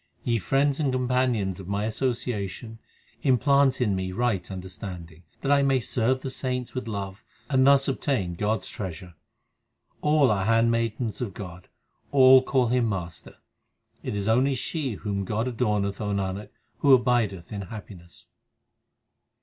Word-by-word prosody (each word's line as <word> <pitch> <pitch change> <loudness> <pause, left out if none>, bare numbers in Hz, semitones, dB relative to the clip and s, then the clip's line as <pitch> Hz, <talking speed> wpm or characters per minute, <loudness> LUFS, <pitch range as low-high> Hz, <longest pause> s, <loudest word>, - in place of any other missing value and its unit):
Ye 115 -2 +1
friends 135 - +1
and 145 -4 +1
companions 125 -6 0
of 95 - -9
my 100 +1 -1
association, 115 -3 -3 0.4
implant 140 +1 +3
in 105 -6 +1
me 95 0 -3
right 110 -4 -1
understanding, 90 -3 -7 0.2
That 140 - 0
I 140 0 +5
may 135 -1 +3
serve 125 +2 0
the 135 - -3
saints 125 -1 -3
with 130 -2 -4
love, 100 -1 -5 0.3
and 130 0 +4
thus 140 -1 +5
obtain 130 -9 -1
God 105 +5 -1
s - - -8
treasure. 90 -4 -6 0.9
All 150 -4 +4
are 95 -2 0
handmaidens 115 0 +1
of 105 -6 -4
God; 90 -2 -9 0.4
all 130 -1 +7
call 130 -2 +1
Him 120 -2 +2
Master, 90 -5 -5 0.7
But - - -3
it - - -4
is 100 0 -2
only 130 +5 +3
she 135 0 -3
whom 100 -1 -3
God 110 +4 -1
adorneth, 105 -4 -1
O 105 -1 -2
Nanak, 100 +1 -3 0.3
who 140 -2 +7
abideth 115 -8 0
in 100 - -4
happiness. 95 -3 -10
115 Hz, 150 wpm, -26 LUFS, 100-130 Hz, 0.9 s, all